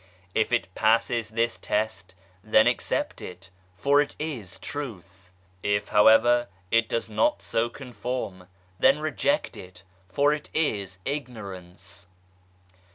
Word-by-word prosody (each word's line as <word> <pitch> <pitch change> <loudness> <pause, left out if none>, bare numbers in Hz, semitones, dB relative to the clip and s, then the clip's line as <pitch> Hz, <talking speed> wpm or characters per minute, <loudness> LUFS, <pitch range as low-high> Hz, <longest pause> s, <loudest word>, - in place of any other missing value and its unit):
If 110 - +1
it 115 -6 0
passes 115 +1 +2
this 115 +1 0
test, 105 -3 -2 0.3
then 110 0 +5
accept 120 0 0
it, 90 +1 -10 0.2
for 140 +9 +4
it 145 - -3
is 125 - -5
Truth! 100 -9 -7 0.3
If, 100 0 0
however, 120 +3 +6 0.2
it 115 -1 +3
does 115 - -1
not 110 0 +1
so 115 +1 0
conform, 120 -7 -5 0.3
then 135 +2 +5
reject 155 - 0
it, 90 0 -12 0.3
for 145 +9 +3
it 150 0 -5
is 100 - 0
ignorance 100 -9 -6
110 Hz, 120 wpm, -26 LUFS, 95-125 Hz, 0.3 s, however